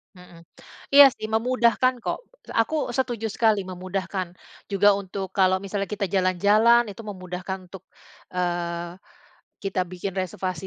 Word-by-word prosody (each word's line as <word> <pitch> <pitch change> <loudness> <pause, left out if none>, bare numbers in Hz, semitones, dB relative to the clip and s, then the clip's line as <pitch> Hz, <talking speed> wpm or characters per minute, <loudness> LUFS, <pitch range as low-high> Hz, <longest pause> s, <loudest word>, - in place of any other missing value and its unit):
Mhm. 170 -2 -16 0.5
Iya 285 0 +11
sih, 215 - -5
memudahkan 250 +1 +2
kok. - - -3 0.4
Aku 315 - -6 0.2
setuju 240 -4 -1
sekali 220 -3 +3
memudahkan. 185 +1 -4 0.4
Juga 200 +1 +4
untuk 195 0 -5
kalau 190 -1 +4
misalnya 200 0 -3
kita 205 -1 -1
jalan-jalan, 200 +6 +4
itu 215 +3 -9
memudahkan 185 0 -5
untuk, 185 0 -11 0.5
eee, 175 -1 -2 0.7
kita 195 -1 -1
bikin 185 +1 -4
reservasi 185 0 -4
190 Hz, 125 wpm, -24 LUFS, 180-215 Hz, 0.7 s, Iya